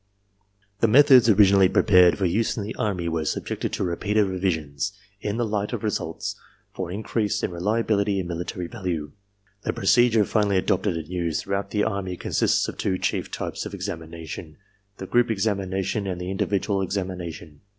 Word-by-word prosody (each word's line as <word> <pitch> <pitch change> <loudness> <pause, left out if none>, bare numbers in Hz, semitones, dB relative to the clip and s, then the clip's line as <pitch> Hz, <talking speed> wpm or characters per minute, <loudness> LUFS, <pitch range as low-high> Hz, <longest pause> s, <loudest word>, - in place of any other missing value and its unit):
The 115 - +4
methods 125 0 +7
originally 100 -2 +6
prepared 90 -5 +5
for 95 - 0
use 110 +8 0
in 105 - -2
the 105 - -5
Army 95 -5 -1
were 80 -1 -1
subjected - - -3
to - - -1
repeated 100 +4 +1
revisions, 90 -2 -2 0.3
in 105 +2 -3
the 120 - +1
light 105 +1 -2
of 115 - -4
results, 100 -1 -3 0.4
for 90 -2 -4
in 100 +5 -5
crease 105 -2 -1
in - - -1
reliability 100 +2 0
and 95 -2 -2
military 85 +1 -4
value. 85 -8 -4 0.5
The - - -2
procedure 115 -3 +4
finally 105 -2 +1
adopted 95 -1 0
and 80 -2 -6
used 85 -3 -2
throughout 100 0 -2
the 105 -1 0
Army 100 -4 -2
consists - - +1
of - - -6
two 95 -2 0
chief - - -2
types - - -4
of - - -7
examination: 80 -1 -7 0.4
the 95 - -6
group 120 +5 +2
examination 100 -1 -1
and 90 -2 -3
the 90 +1 -4
individual 100 0 0
examination. 90 -5 -5
95 Hz, 170 wpm, -24 LUFS, 90-105 Hz, 0.5 s, methods